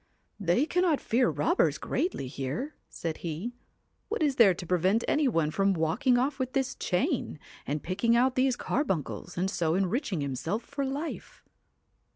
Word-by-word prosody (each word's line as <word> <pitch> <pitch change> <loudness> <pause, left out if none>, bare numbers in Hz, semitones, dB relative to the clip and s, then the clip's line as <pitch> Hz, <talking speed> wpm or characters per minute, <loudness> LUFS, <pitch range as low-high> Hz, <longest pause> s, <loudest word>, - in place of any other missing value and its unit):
1 195 - -8
They 210 - +4
cannot 350 -2 +2
fear 245 +2 +2
robbers 150 0 +2
greatly 290 - -2
here,' 140 - -4 0.2
said 165 -2 -4
he; 175 +9 -4 0.3
* - - -45
what 440 -6 -1
is 280 -3 +1
there 200 -6 +7
to 180 - -7
prevent 185 +6 +2
any 295 -1 +2
one 165 -10 +1
from 195 +3 +2
walking 175 - +2
off 265 +3 0
with 255 -1 -2
this 265 -2 0
chain, 250 - -1 0.3
and 150 +1 -2
picking 215 +6 +1
out 255 +2 +3
these 255 0 +2
carbuncles, 185 - -2
and 180 +2 +1
so 170 -4 0
enriching 195 - 0
himself 145 - -2
for 280 -1 -3
life 285 +5 -5
220 Hz, 170 wpm, -29 LUFS, 165-270 Hz, 0.3 s, there